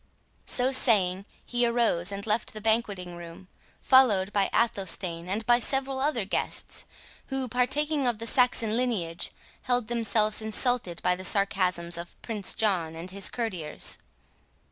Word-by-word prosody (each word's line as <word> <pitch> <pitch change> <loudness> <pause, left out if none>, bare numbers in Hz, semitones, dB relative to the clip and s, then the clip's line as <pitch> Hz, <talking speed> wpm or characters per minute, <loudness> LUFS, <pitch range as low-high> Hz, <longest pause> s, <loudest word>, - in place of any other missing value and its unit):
So 255 +1 +4
saying, 200 -7 +4 0.2
he 245 0 -1
arose 230 -7 +1
and 200 0 -5
left 215 +1 -1
the - - -4
banqueting 205 -5 -1
room, 170 +1 -11 0.3
followed 210 -7 +4
by 200 -1 +1
Athelstane, 185 -6 -1
and 215 +4 -2
by 240 0 +5
several 270 +2 -1
other 265 -7 0
guests, 195 - -3 0.4
who, 270 -1 -2
partaking 275 +4 0
of 240 -3 0
the 230 - -6
Saxon 230 -2 +2
lineage, 205 -9 -2 0.3
held 245 -3 0
themselves 220 -2 +1
insulted 220 -4 0
by 180 - +2
the 185 - -7
sarcasms 185 -4 +1
of 170 0 -10
Prince 210 -5 -4
John 175 -7 0
and 170 +3 -7
his 200 0 0
courtiers. 185 -11 -1
215 Hz, 145 wpm, -27 LUFS, 185-245 Hz, 0.4 s, by